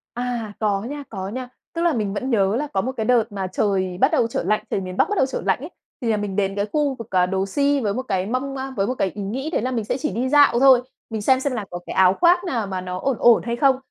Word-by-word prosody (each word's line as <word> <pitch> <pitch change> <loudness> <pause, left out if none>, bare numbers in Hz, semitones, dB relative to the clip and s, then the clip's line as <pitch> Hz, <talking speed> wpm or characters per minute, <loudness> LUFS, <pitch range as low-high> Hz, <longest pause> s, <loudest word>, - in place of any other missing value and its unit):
À, 240 -3 -3
có 205 -2 +1
nha, 285 +6 -5
có 190 -3 -5
nha. 250 +4 -5 0.3
Tức 335 - -2
là 340 -1 +3
mình 210 -6 -2
vẫn 255 +6 -3
nhớ 200 -2 +2
là 295 +4 -1
có 195 - +1
một 255 +7 -2
cái 220 - -2
đợt 245 -3 +4
mà 195 -2 -3
trời 185 -1 -1
bắt 265 - +5
đầu 275 -7 +3
trở - - -2
lạnh, 215 - 0
trời - - 0
miền 185 -1 -6
Bắc - - +3
bắt 415 - -1
đầu 265 - +3
trở 265 - -4
lạnh - - +2
ấy, 300 +5 -7 0.3
thì 235 -3 -1
là 215 - +2
mình 205 -2 -4
đến 195 -1 0
cái 200 0 0
khu 295 -3 +1
vực, 230 -3 -10
à, 180 -1 +3
đồ 190 +1 -1
si 285 +7 +1
với 205 -5 -1
một 255 - -2
cái 190 -7 -2
mong, 260 +4 -2
a, 265 0 -4
với 195 - +1
một 250 - -1
cái 195 -6 0
ý 205 - -5
nghĩ 260 +10 -3
đấy 320 - -1
là 255 - -1
mình 235 -4 -2
sẽ - - -1
chỉ - - -2
đi 240 +6 -1
dạo 285 -4 +5
thôi, 260 -2 +7 0.3
mình 220 -2 -3
xem 260 +4 +3
xem 280 0 -1
là 225 -5 -3
có 175 - -5
cái - - -5
áo 185 0 +5
khoác 350 +1 +4
nào 235 - -2
mà 190 -1 -3
nó 180 0 -5
ổn 270 +5 -1
ổn 240 -1 +5
hay 235 0 -3
không. 270 +1 +4
230 Hz, 310 wpm, -22 LUFS, 195-265 Hz, 0.3 s, thôi